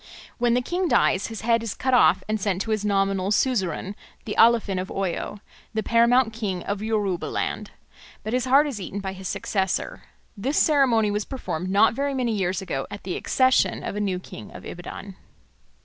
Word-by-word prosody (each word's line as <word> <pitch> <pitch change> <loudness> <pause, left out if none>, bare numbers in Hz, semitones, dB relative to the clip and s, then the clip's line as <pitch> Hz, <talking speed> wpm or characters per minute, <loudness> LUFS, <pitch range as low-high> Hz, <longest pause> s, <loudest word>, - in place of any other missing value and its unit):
When 240 0 +3
the 250 - +1
king 360 +6 -1
dies 195 - +2
his 225 -1 -7
head 230 0 +2
is 225 -4 -4
cut 260 0 -1
off 250 - +5
and 215 -1 -1
sent 195 -1 0
to 225 - -4
his 215 -1 0
nominal 195 -2 +1
suzerain, 200 - 0 0.3
the 210 - -3
Alafin 220 -5 +4
of 185 - -6
Oyo, 195 +2 -3 0.3
the 220 - 0
paramount 235 0 +3
king 200 -6 -3
of 200 0 -3
Yoruba 210 -5 -1
land; - - -3 0.5
but 215 - -4
his 250 0 +1
heart 275 +3 +5
is 260 -9 -4
eaten 195 +2 -5
by 190 -1 -4
his 190 -1 -7
successor. 190 0 -2 0.3
This 255 +8 -2
ceremony 250 -8 +3
was 210 +1 -1
performed 185 - -4
not 205 +4 +4
very 280 +2 -1
many 250 -3 0
years 190 -3 -1
ago 135 -7 -3
at 205 - -8
the 185 - -3
accession 260 0 +2
of - - -4
a - - -2
new 195 -3 -1
king 115 - -10
of - - -11
Ibadan. 185 +2 -8
210 Hz, 195 wpm, -24 LUFS, 190-235 Hz, 0.5 s, off